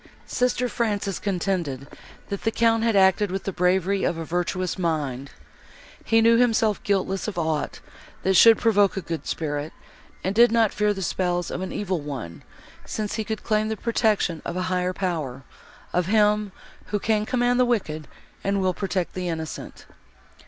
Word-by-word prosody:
Sister 250 0 0
Frances 205 -5 -1
contended, 175 -8 -2 0.4
that 200 - -4
the 225 - +1
Count 225 0 +2
had 230 -1 +2
acted 195 +1 +4
with 190 +1 -3
the 195 - -2
bravery 185 +2 +1
of 165 - 0
a 165 - -4
virtuous 180 +2 -1
mind. 145 -6 -2 0.7
He 225 0 +3
knew 230 +1 +5
himself 225 -3 +2
guiltless 195 -1 -1
of 210 - -5
aught, 160 -3 -2 0.4
that 190 - +2
should 225 +4 +8
provoke 205 -4 +3
a - - -1
good 165 -1 -4
spirit, 145 -1 -3 0.5
and 190 - 0
did 235 +2 +6
not 225 -2 +3
fear 210 0 +2
the 195 -2 -3
spells 175 -1 -1
of 180 - -4
an 190 - -4
evil 190 -5 -2
one, 130 - -6 0.4
since 210 -1 -4
he 220 - -2
could 220 0 -5
claim 215 0 +1
the 220 - -2
protection 215 -8 +1
of - - -4
a 185 - -1
higher 180 0 0
Power, 155 -9 -3 0.5
of 180 -1 +1
Him, 210 0 +3 0.4
who 210 - -1
can 215 +1 +1
command 245 -1 +2
the - - +6
wicked, 160 - -1 0.4
and 200 0 0
will 185 -1 +1
protect 190 -2 -2
the 180 -1 -3
innocent. 160 -3 -6
195 Hz, 175 wpm, -24 LUFS, 175-215 Hz, 0.7 s, should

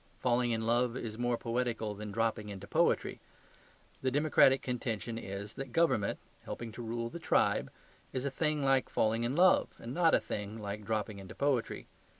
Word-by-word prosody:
Falling 125 -1 +2
in 110 -1 -1
love 120 +1 +2
is 110 -2 -5
more 120 -1 +1
poetical 115 -3 -1
than 105 0 -7
dropping 110 0 -1
into 100 -1 -7
poetry. - - +1 0.8
The 130 - +1
democratic 135 -1 +4
contention 115 -2 -3
is 100 0 -6
that 135 -2 -6
government 125 -9 +2 0.3
(helping 115 -1 -6
to 120 - -8
rule 115 0 -3
the 170 - -7
tribe) 165 - +2 0.4
is 130 0 -2
a 140 - -1
thing 150 +1 0
like 135 -1 +3
falling 115 +2 +1
in 125 +4 -1
love, 180 +2 +5
and 120 +2 -7
not 165 0 +4
a - - +4
thing 105 +1 -5
like 105 -1 -5
dropping 105 -1 -2
into 95 -1 -10
poetry. 140 -4 0
115 Hz, 175 wpm, -32 LUFS, 110-130 Hz, 0.8 s, love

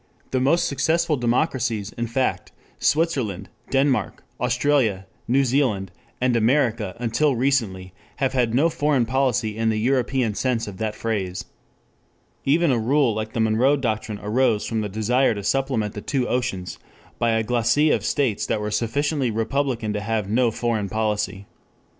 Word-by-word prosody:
The 130 - +1
most 165 +7 +3
successful 160 +3 +1
democracies, 120 -4 0
in 120 0 -4
fact, 130 +3 -1 0.3
Switzerland, 145 - 0 0.2
Denmark, 135 -1 0 0.2
Australia, 125 -5 +1 0.2
New 135 +3 +3
Zealand, 115 -8 0 0.3
and 125 -1 +1
America 115 -4 +1
until 125 +5 +1
recently, 115 -8 0 0.2
have 135 -1 -1
had 120 -3 +1
no 145 +6 +4
foreign 145 -6 +1
policy 120 -3 0
in 115 0 0
the 110 - 0
European 125 0 +1
sense 120 0 -1
of 100 -2 -8
that 110 0 -3
phrase. 100 -5 -3 1.0
Even 160 +3 +3
a 120 - +2
rule 130 +1 +2
like 110 +1 -4
the - - -2
Monroe 115 +6 +3
Doctrine 110 -4 -2
arose 110 0 +1
from 110 -1 -1
the 105 - -3
desire 115 +4 +1
to 100 - -5
supplement 125 -3 0
the 105 - -6
two 130 0 -1
oceans 120 -8 -2 0.4
by 115 -1 +2
a 110 0 +1
glacis 120 +6 +2
of - - -1
states 130 -8 0
that - - 0
were 105 0 -3
sufficiently 130 +5 0
republican 115 0 -1
to 105 - -2
have 110 -1 -1
no 120 +3 +2
foreign 110 -3 -2
policy. 105 -2 -2
120 Hz, 155 wpm, -23 LUFS, 110-135 Hz, 1.0 s, no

